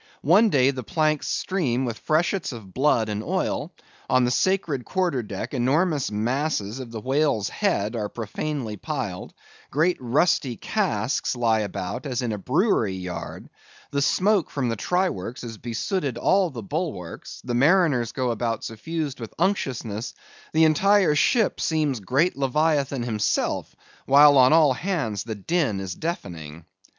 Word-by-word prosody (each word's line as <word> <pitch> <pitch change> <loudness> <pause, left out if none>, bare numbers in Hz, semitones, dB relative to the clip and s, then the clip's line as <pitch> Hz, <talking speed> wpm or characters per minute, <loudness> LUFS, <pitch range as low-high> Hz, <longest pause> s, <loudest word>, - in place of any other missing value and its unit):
One 200 +9 +5
day 135 -5 +4
the 130 -2 -5
planks 155 +5 0
stream 135 -10 -1
with 115 -2 -4
freshets 170 +3 0
of 105 -7 -10
blood 130 -5 +2
and 105 0 -3
oil; - - -2 0.4
on 130 -1 +4
the 125 - +1
sacred 170 -5 +1
quarter 175 -7 0
deck 105 +3 -6
enormous 145 +4 +1
masses 115 +1 -1
of 130 -3 -7
the 115 -1 -6
whale's 135 -3 +1
head 105 +4 -1
are 105 -2 -2
profanely 115 0 -4
piled; - - -4 0.4
great 165 +6 +2
rusty 130 0 +1
casks 135 - -1
lie 115 -2 +2
about, 105 +5 -4
as 125 -1 -2
in 120 - -1
a 105 - -3
brewery 125 - +1
yard; 90 -2 -6 0.4
the 140 - 0
smoke 190 +5 +2
from 130 -4 -2
the 115 - -1
try 180 - +1
works 115 - -6
has 115 -2 -7
besooted 130 - -2
all 190 +6 +3
the 120 -7 -7
bulwarks; 120 - -5
the 125 - -2
mariners 140 - +3
go 130 -2 -1
about 115 0 -2
suffused 145 +5 -4
with 115 -2 -8
unctuousness; 130 - -2 0.4
the 160 +1 +4
entire 190 +3 +4
ship 220 - +2
seems 150 -6 0
great 140 - +1
leviathan 140 -1 +1
himself; 110 -3 -1 0.3
while 145 +1 +7
on 125 +1 +6
all 155 -4 +5
hands 130 - -2
the 110 -2 -4
din 110 - 0
is 95 -1 -4
deafening. 85 - -6
130 Hz, 150 wpm, -24 LUFS, 110-160 Hz, 0.4 s, while